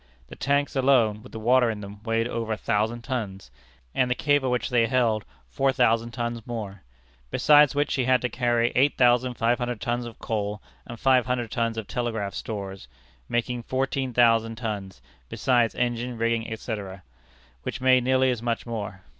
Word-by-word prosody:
The - - -9
tanks 140 +1 0
alone, 125 -6 +3
with - - -14
the 110 - -7
water 120 +2 +4
in 105 -2 -4
them, 100 0 -10
weighed 115 +1 0
over 115 -2 -3
a - - -4
thousand 110 +4 -1
tons; 100 - -5 0.4
and 125 - +1
the 125 - +1
cable 145 -2 +2
which 125 +2 -1
they 115 -2 +3
held, 115 -3 +1 0.2
four 135 0 +1
thousand 115 -2 +2
tons 120 -1 -4
more; 105 -5 -6 0.5
besides 150 - +5
which 145 +1 +1
she 130 -2 0
had 130 0 +4
to 125 - 0
carry 120 0 +1
eight 140 +3 +3
thousand 125 0 +3
five 115 +2 +1
hundred 120 -2 -3
tons 120 +1 -2
of 115 - -11
coal 105 -2 -3 0.3
and 120 -1 -8
five 130 -3 +3
hundred 120 -3 -2
tons 115 0 -1
of 110 - -3
telegraph 110 -5 -3
stores, 100 - -6 0.4
making 120 +1 -1
fourteen 130 +1 -2
thousand 115 -1 +3
tons, 105 -5 -5 0.3
besides 120 0 +1
engines, 120 0 -2
rigging, 115 0 -1
etc., 100 -4 -6 0.6
which - - -5
made 130 -1 +4
nearly 130 0 +3
as 120 -3 -3
much 115 -1 -2
more. 105 -5 -5
120 Hz, 180 wpm, -25 LUFS, 110-125 Hz, 0.6 s, besides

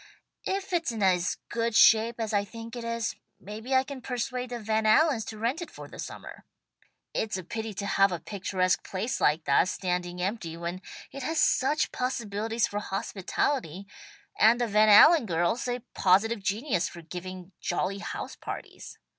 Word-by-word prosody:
"If 390 0 -3
it's 335 -6 +1
in 220 -3 -3
as 180 -1 +2
good 230 -1 -1
shape 225 +2 +5
as 220 -1 -2
I 200 -1 +2
think 230 +3 -9
it 240 - -6
is, 230 -1 -2 0.2
maybe 220 +7 -4
I 260 - +5
can 270 -1 -8
persuade 250 0 -3
the 245 - -4
Van 220 -1 0
Allens 255 +1 +4
to 220 - -7
rent 240 +10 -1
it 345 - -6
for - - -10
the - - -12
summer. - - -8 0.7
It's 220 -2 -1
a 185 - -6
pity 220 +5 -5
to 200 - -4
have 195 -1 +3
a 175 - -3
picturesque 185 +1 -1
place 210 +7 -3
like 155 +2 +3
that 140 +5 +3
standing 180 -1 -2
empty 180 -3 -3
when 170 +2 -5 0.3
it 275 - -7
has 320 +5 -1
such 280 +4 +2
possibilities 225 -2 -1
for 205 - -3
hospitality, 195 - -2 0.5
and 230 +3 +6
the 240 - +2
Van 215 0 +4
Allen 295 +5 +8
girls 175 +8 0
a 245 0 -2
positive 205 +4 +3
genius 200 - -1
for 170 - -11
giving 180 +2 -8
jolly 185 +3 -1
house - - -6
parties. - - -8
215 Hz, 175 wpm, -28 LUFS, 185-240 Hz, 0.7 s, Allen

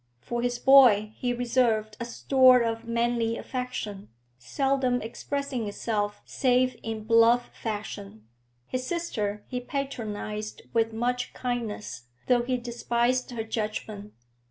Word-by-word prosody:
For 240 - -3
his 245 0 0
boy 240 -6 +6
he 245 - -1
reserved 235 -3 +1
a 235 - -3
store 255 +1 +5
of 225 0 -2
manly 235 0 0
affection, 230 -6 -5 0.3
seldom 260 - 0
expressing 260 +1 -3
itself 205 0 -2
save 255 -1 +2
in 220 -1 -4
bluff 230 +2 +4
fashion; 110 - -6 0.4
his 255 - -3
sister 210 -12 -2
he 250 - -3
patronised 215 -6 -4
with 225 -1 +2
much 245 +2 -2
kindness, 215 - -4 0.2
though 245 -1 +3
he 250 +1 -1
despised 240 +1 0
her 235 -3 -4
judgment. 215 -2 -4
235 Hz, 120 wpm, -27 LUFS, 215-250 Hz, 0.4 s, boy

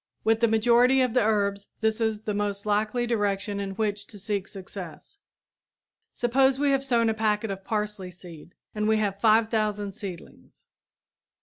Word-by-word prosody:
With 225 0 +3
the 230 - +4
majority 240 +4 +4
of 250 -3 +1
the 250 - +3
herbs 200 -2 0
this 220 +1 +1
is 220 -2 0
the 215 -1 -3
most 205 0 -2
likely 215 +3 0
direction 205 -3 -1
in 195 -1 -4
which 205 -1 -2
to 210 - -12
seek 200 -1 -3
success. 195 - -10 0.9
Suppose 265 +2 +2
we 285 0 +2
have 270 0 +1
sown 235 -4 +2
a 220 - +2
packet 215 -1 0
of 195 0 -6
parsley 210 -3 -3
seed 175 -2 -13 0.2
and 210 0 -1
we 220 0 +3
have 200 -2 -1
five 220 0 +4
thousand 210 -2 -1
seedlings. 190 -4 -10
215 Hz, 170 wpm, -26 LUFS, 200-225 Hz, 0.9 s, the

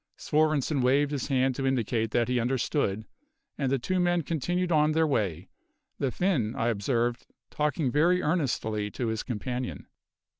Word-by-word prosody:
Svorenssen 155 -2 +1
waved 140 +3 +3
his 140 -4 -2
hand 130 -1 +2
to 135 +1 -2
indicate 115 -3 0
that 120 +2 +1
he 125 0 +1
understood, 120 -3 0 0.5
and 135 -3 -1
the 135 - +3
two 185 +9 -1
men 175 -1 +2
continued 175 +4 -1
on 155 -1 +3
their 160 +1 +3
way; 95 - -1 0.5
the 135 - +1
Finn, 130 - 0
I 115 - 0
observed, 120 +3 -1 0.2
talking 150 -2 0
very 170 +6 +3
earnestly 120 -11 -1
to 115 +2 -3
his 110 -1 -2
companion. 125 +1 -4
130 Hz, 155 wpm, -28 LUFS, 120-155 Hz, 0.5 s, waved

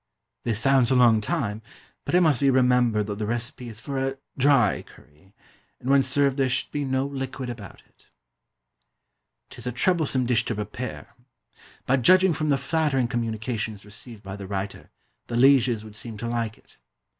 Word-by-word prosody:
This 110 -3 +1
sounds 130 0 +4
a 130 - +3
long 120 -3 +5
time, 105 0 -2 0.4
but - - 0
it 180 - +6
must 155 -7 +3
be 140 - +4
remembered 125 -4 +3
that 105 0 -5
the 105 - -2
recipe 120 +1 -4
is 110 -1 -9
for 135 +4 -4
a 135 0 -2 0.2
dry 135 -6 +3
curry; 80 +7 -21 0.4
and 130 - -2
when 140 0 +6
served 135 +1 +1
there 135 -1 +2
should 130 - -1
be 145 - -2
no 130 0 0
liquid 135 -2 -5
about 105 -6 -11
it. - - -27 1.4
'Tis - - -8
a - - -1
troublesome 140 -2 +1
dish 120 -1 +2
to 120 - -2
prepare; 105 +4 -6 0.7
but, 130 0 +2
judging 185 +6 +5
from 155 0 -2
the 140 - +3
flattering 140 -3 0
communications 110 -2 -3
received 105 +1 -11
by 95 0 -7
the 100 -1 -8
writer, 100 0 -5 0.4
the 120 - -2
lieges 125 -4 +4
would 110 -1 -12
seem 110 0 -6
to 115 - -4
like 115 -2 -2
it. - - -23
125 Hz, 180 wpm, -25 LUFS, 110-135 Hz, 1.4 s, it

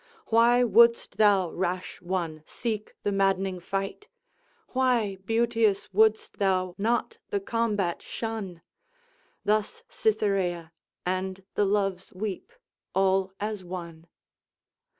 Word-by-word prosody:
Why 235 +2 +5
wouldst 235 +1 +4
thou, 200 -5 +4
rash 180 0 -3
one, 175 -4 -3
seek 220 -3 -4
the 205 - +1
maddening 195 -1 +1
fight? 195 - -4 0.6
Why, 245 -6 +1
beauteous, 225 -3 +1
wouldst 220 +2 +3
thou 185 -2 +1
not 230 +4 0
the 405 - 0
combat 220 - -1
shun?" 205 -7 -5 0.8
Thus 215 - 0
Cytherea 190 - 0 0.3
and 185 +1 -2
the 205 - +2
Loves 195 -2 0
weep, 200 - -5 0.4
all 190 0 +2
as 210 -2 -3
one. 170 -2 -8
195 Hz, 105 wpm, -27 LUFS, 185-225 Hz, 0.8 s, Why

